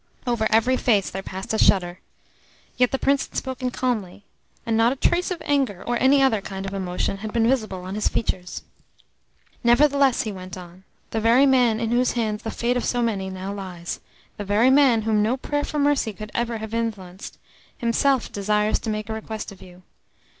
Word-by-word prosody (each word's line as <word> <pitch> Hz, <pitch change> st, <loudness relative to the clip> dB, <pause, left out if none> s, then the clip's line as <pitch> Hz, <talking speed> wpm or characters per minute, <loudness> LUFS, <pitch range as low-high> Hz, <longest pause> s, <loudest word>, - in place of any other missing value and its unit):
Over 235 Hz, -3 st, +1 dB
ever 225 Hz, +4 st, +3 dB
face 210 Hz, -5 st, +2 dB
there 190 Hz, -, -4 dB
passed 190 Hz, +2 st, -6 dB
a 220 Hz, -, 0 dB
shudder. 180 Hz, -2 st, +3 dB, 0.8 s
Yet 250 Hz, -1 st, +3 dB
the 270 Hz, -, -1 dB
Prince 275 Hz, +1 st, +1 dB
had -, -, -22 dB
spoken 260 Hz, -1 st, -3 dB
calmly, 220 Hz, -7 st, -3 dB, 0.4 s
and 230 Hz, -, 0 dB
not 225 Hz, +2 st, +4 dB
a -, -, -2 dB
trace 345 Hz, +6 st, +1 dB
of 360 Hz, -2 st, -4 dB
anger 270 Hz, -10 st, 0 dB
or 240 Hz, -, 0 dB
any 275 Hz, +1 st, +5 dB
other 225 Hz, -6 st, +2 dB
kind 195 Hz, 0 st, -6 dB
of 195 Hz, -, -5 dB
emotion 190 Hz, 0 st, -2 dB
had 215 Hz, +2 st, -6 dB
been 230 Hz, 0 st, +2 dB
visible 215 Hz, -8 st, -1 dB
on 185 Hz, +1 st, -6 dB
his 210 Hz, +1 st, 0 dB
features. 185 Hz, -5 st, -2 dB, 1.0 s
"Nevertheless," 275 Hz, +2 st, +4 dB
he 215 Hz, -, -4 dB
went 185 Hz, -1 st, -8 dB
on, 180 Hz, +1 st, -12 dB, 0.3 s
"the 225 Hz, -, -1 dB
very 235 Hz, +5 st, +5 dB
man 250 Hz, -5 st, +3 dB
in 225 Hz, -1 st, -1 dB
whose 245 Hz, +1 st, +2 dB
hands 220 Hz, -3 st, -1 dB
the 225 Hz, -, -4 dB
fate 240 Hz, +2 st, -1 dB
of 245 Hz, -, -2 dB
so 245 Hz, -1 st, 0 dB
many 200 Hz, -5 st, -1 dB
now 190 Hz, +1 st, -5 dB
lies, 180 Hz, -4 st, -6 dB, 0.4 s
the 205 Hz, -, -4 dB
very 210 Hz, +6 st, +3 dB
man 265 Hz, -5 st, +5 dB
whom 215 Hz, -1 st, +2 dB
no 225 Hz, +5 st, +1 dB
prayer 290 Hz, +2 st, -2 dB
for 300 Hz, -, -4 dB
mercy 285 Hz, -6 st, +1 dB
could 215 Hz, +1 st, -9 dB
ever 235 Hz, -1 st, -1 dB
have 220 Hz, 0 st, -7 dB
influenced, 205 Hz, -5 st, -4 dB, 0.4 s
himself 250 Hz, +2 st, +1 dB
desires 210 Hz, +1 st, +1 dB
to 225 Hz, -, -5 dB
make 215 Hz, -1 st, -3 dB
a 220 Hz, -, -4 dB
request 220 Hz, -1 st, -6 dB
of 195 Hz, -, -14 dB
you. 180 Hz, 0 st, -15 dB
220 Hz, 200 wpm, -23 LUFS, 195-250 Hz, 1.0 s, any